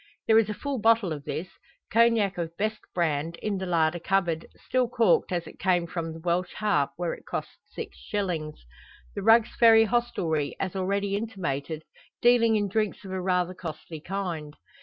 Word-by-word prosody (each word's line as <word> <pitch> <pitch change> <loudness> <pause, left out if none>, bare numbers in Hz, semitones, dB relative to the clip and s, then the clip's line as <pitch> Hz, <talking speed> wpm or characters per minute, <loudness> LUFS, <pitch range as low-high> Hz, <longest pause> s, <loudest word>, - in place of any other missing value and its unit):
There 220 0 +6
is 220 -2 +1
a 210 - -3
full 280 0 -3
bottle 225 -5 +3
of 145 -1 -8
this 165 +3 -3 0.5
Cognac 230 -4 +4
of 165 0 -4
best 215 +1 -1
brand 165 -1 -1
in 200 +2 -3
the 190 - -4
larder 165 -1 +2
cupboard, 170 -2 0
still 255 -2 0
corked 225 -8 +3
as 175 -2 -1
it - - -13
came 180 -2 +2
from 165 -1 -4
the 160 - -8
"Welsh 175 +2 -1
Harp," 200 -10 +1
where 175 -1 -2
it - - -12
cost - - -5
six - - -8
shillings 170 - -3 0.5
The 200 - -4
Rugg's 225 +2 +5
Ferry 225 -1 +8
hostelry, 190 -10 0
as 190 -1 -3
already 200 +1 0
intimated, 165 - -3 0.4
dealing 235 -2 +5
in 205 -1 +1
drinks 210 0 -1
of 190 - -7
a 190 0 -2
rather 180 -1 +1
costly 160 -2 -7
kind. 170 -5 -4
185 Hz, 180 wpm, -27 LUFS, 165-215 Hz, 0.5 s, Ferry